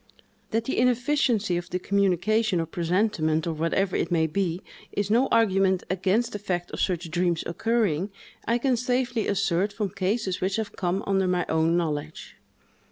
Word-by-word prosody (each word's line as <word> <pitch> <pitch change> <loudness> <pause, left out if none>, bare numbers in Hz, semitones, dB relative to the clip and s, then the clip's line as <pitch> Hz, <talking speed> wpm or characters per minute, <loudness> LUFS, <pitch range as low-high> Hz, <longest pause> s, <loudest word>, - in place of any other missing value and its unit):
That 225 +1 0
the 265 - -1
inefficiency 245 -6 +2
of 175 0 -5
the 180 - -1
communication, 200 +2 +1
or 165 - 0
presentiment, 165 -2 0
or 165 - -1
whatever 165 +4 0
it - - 0
may 165 -2 +2
be, 175 +2 -2 0.3
is 205 0 -2
no 245 +4 +4
argument 195 -4 +2
against 195 +6 +1
the 205 - -5
fact 180 -3 -3
of - - -6
such 175 -3 -1
dreams 175 -1 0
occurring, 200 -2 0 0.4
I 235 - +3
can 250 0 +1
safely 245 -2 0
assert, 200 0 +1
from 205 -1 -2
cases 200 -1 -1
which 190 +1 0
have 220 -2 -3
come 185 +2 -1
under 195 -1 +1
my 180 -1 +1
own 160 +1 +2
knowledge. 155 -2 -4
190 Hz, 165 wpm, -26 LUFS, 175-220 Hz, 0.4 s, no